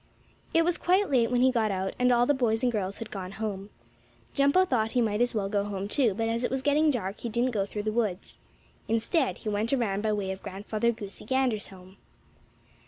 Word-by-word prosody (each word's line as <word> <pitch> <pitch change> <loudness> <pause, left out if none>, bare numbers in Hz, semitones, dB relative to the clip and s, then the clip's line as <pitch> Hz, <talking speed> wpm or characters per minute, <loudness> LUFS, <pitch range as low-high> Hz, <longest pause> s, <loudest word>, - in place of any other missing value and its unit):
It 330 0 +3
was 350 0 +1
quite 375 0 +2
late 240 -4 +3
when 245 -1 +2
he 260 0 +5
got 225 -3 +1
out, 190 -1 -2
and 250 0 +4
all 240 0 +4
the 290 - +3
boys 235 -4 0
and 245 - +3
girls 200 -3 -2
had 230 - -8
gone 190 -1 -6
home. 200 -2 -4 0.6
Jumpo 280 +7 +4
thought 225 -6 0
he 250 - +2
might 215 -1 0
as 245 -1 +1
well 200 -2 0
go 200 0 0
home, 200 -1 -4
too, 230 -3 +2
but 225 +2 -1
as 230 +2 -1
it - - +1
was 265 0 -2
getting 300 +2 +3
dark 215 -7 -2
he 235 - -4
didn't 240 +3 +1
go 200 -4 -1
through 210 0 -5
the 215 - -1
woods. 215 -5 -2 0.5
Instead 240 +6 +1
he 215 - -5
went 210 +2 -1
around 220 -7 0
by 215 0 0
way 200 -2 -1
of 190 - -7
Grandfather 210 +4 -1
Goosey 205 -3 -8
Gander's 255 -3 0
home. 185 0 -15
225 Hz, 230 wpm, -28 LUFS, 200-250 Hz, 0.6 s, he